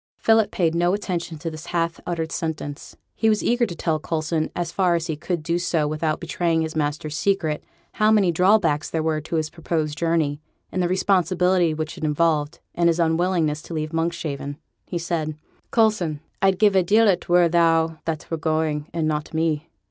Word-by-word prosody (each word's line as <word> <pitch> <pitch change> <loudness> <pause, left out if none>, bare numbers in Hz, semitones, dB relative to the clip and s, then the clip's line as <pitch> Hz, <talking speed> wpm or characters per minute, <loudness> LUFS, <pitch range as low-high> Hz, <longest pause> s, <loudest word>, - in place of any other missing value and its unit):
Philip 225 -1 +3
paid 165 -3 +1
no 175 +2 +2
attention 175 -5 -4
to 165 +2 -5
this 155 +1 -9
half 170 -1 -1
uttered 165 -2 -2
sentence; 155 -3 -5 0.2
he 220 - +1
was 215 -1 +1
eager 240 0 +2
to 170 - -6
tell 160 -1 -1
Coulson, 155 0 -1
as 175 -1 -2
far 180 -2 +2
as 165 -1 -1
he 160 - -2
could 170 +1 -3
do 170 +2 0
so 165 -4 0
without 155 +1 -1
betraying 165 -1 0
his 160 0 -3
master's 150 0 -2
secret, 165 -5 0 0.3
how 215 0 +2
many 205 -5 +4
drawbacks 170 -4 +3
there 160 -1 -1
were 155 -1 0
to 165 - -5
his 155 -1 -1
proposed 155 -2 -2
journey, 160 -3 0 0.3
in 185 - -2
the 180 - +2
responsibility 180 -2 +2
which 155 0 -5
it - - -8
involved, 155 -1 +1 0.2
and 170 0 +3
his 170 0 +1
unwillingness 165 -2 +1
to 165 - -8
leave 155 +1 -3
Monkshaven: 160 -4 -2 0.3
he 175 - -3
said 165 -3 -2 0.3
'Coulson, 210 -9 +2 0.2
I'd 195 -1 +3
give 205 -1 +4
a 190 - +6
deal 215 +5 +4
it 180 -3 +1
were 175 0 +5
thou 165 -1 +2
that 160 -2 -3
were 165 - 0
going, 155 -1 -1
and 165 -2 -1
not 150 0 -3
me. 160 0 0
165 Hz, 195 wpm, -23 LUFS, 155-175 Hz, 0.3 s, a